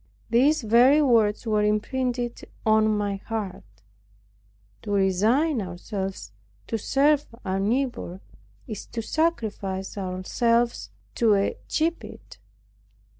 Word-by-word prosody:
These 270 +5 +3
very 245 +7 +5
words 230 -7 +3
were 215 -2 +1
imprinted 240 +3 -1 0.2
on 215 0 +4
my 205 -2 -1
heart: 190 - -7 1.0
"To - - -9
resign 215 - +2
ourselves 190 - -5 0.3
to 225 - -3
serve 290 +6 +2 0.2
our 190 0 -1
neighbor 225 -4 -1 0.5
is 215 -6 -7
to 230 - -5
sacrifice 210 - -2
ourselves 230 +6 0 0.2
to 225 -3 +3
a 200 0 0
gibbet. 330 +2 -3
220 Hz, 100 wpm, -25 LUFS, 195-250 Hz, 1.0 s, very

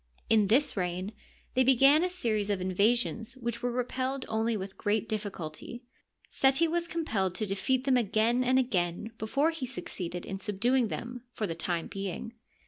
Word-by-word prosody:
In 215 -2 +5
this 255 +8 +3
reign 185 +2 -2 0.4
they 260 - +4
began 275 +5 +6
a 365 - +1
series 220 - -1
of 200 -2 0
invasions 220 +5 +1
which 235 -1 -4
were 245 - 0
repelled 255 +2 -2
only 220 0 0
with 190 0 -6
great 215 +1 0
difficulty. 205 +1 -5 0.5
Seti 270 +5 +4
was 340 +1 0
compelled 220 - -1
to 215 - -1
aefeat 245 +7 0
them 265 -2 +3
again 230 +2 +2
and 255 +1 +3
again 200 -4 0
before 275 +9 +1
he 305 -6 -5
succeeded 180 -8 -5
in 195 - -5
subduing 230 +5 +1
them 245 +3 -5
for 215 - -2
the 165 - -3
time 165 0 -2
being. 195 +3 -5
225 Hz, 165 wpm, -29 LUFS, 195-255 Hz, 0.5 s, began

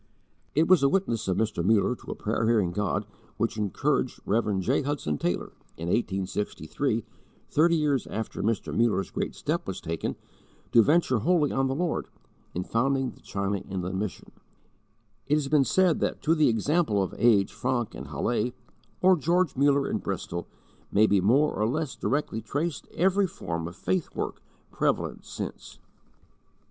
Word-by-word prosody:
It 160 +3 +4
was 185 -4 +6
the 140 - +4
witness 120 - 0
of 95 - +1
Mr. 110 -6 0
Muller 105 +3 +3
to - - -14
a - - -3
prayer 110 +1 -1
hearing 105 -7 +3
God 105 +2 -1 0.3
which 115 0 0
encouraged 105 -4 0
Rev. 105 -2 +1
J. 125 +9 +1
Hudson 135 - -2
Taylor, 85 0 -1 0.3
in 85 +1 -4
1863, 105 - -1 0.5
thirty 170 +3 +4
years 145 -5 +1
after 110 0 -4
Mr. 110 +1 -1
Muller's 110 -5 +1
great - - -3
step - - -2
was - - -4
taken, 80 0 -3 0.6
to 115 - +7
venture 145 -1 +3
wholly 155 - +2
on 135 0 +1
the 135 - -1
Lord, 170 +2 -1 0.5
in 90 - -1
founding 130 +4 0
the - - -18
China 100 0 -2
Inland 95 0 -4
Mission. 105 -2 -5 1.0
It 145 - +3
has 145 -2 0
been 150 -2 +5
said 185 0 +3
that - - -1
to 160 - +4
the 155 -4 +4
example 115 - +2
of 95 - -4
A. - - -10
H. 105 -4 +4
Francke 120 0 -1
in 70 - -7
Halle, 105 - -1 0.5
or 185 0 +7
George 170 +2 +1
Muller 140 +1 +3
in - - -1
Bristol, 85 0 -4 0.4
may 105 +2 +5
be 100 -3 +3
more 135 +10 +3
or 105 - 0
less 150 +1 -2
directly 140 -5 -1
traced 145 +9 -3
every 190 +2 +3
form 85 - -4
of 85 - -9
'faith 180 - -1
work,' - - -3 0.3
prevalent - - -1
since. - - -7
115 Hz, 165 wpm, -27 LUFS, 100-150 Hz, 1.0 s, to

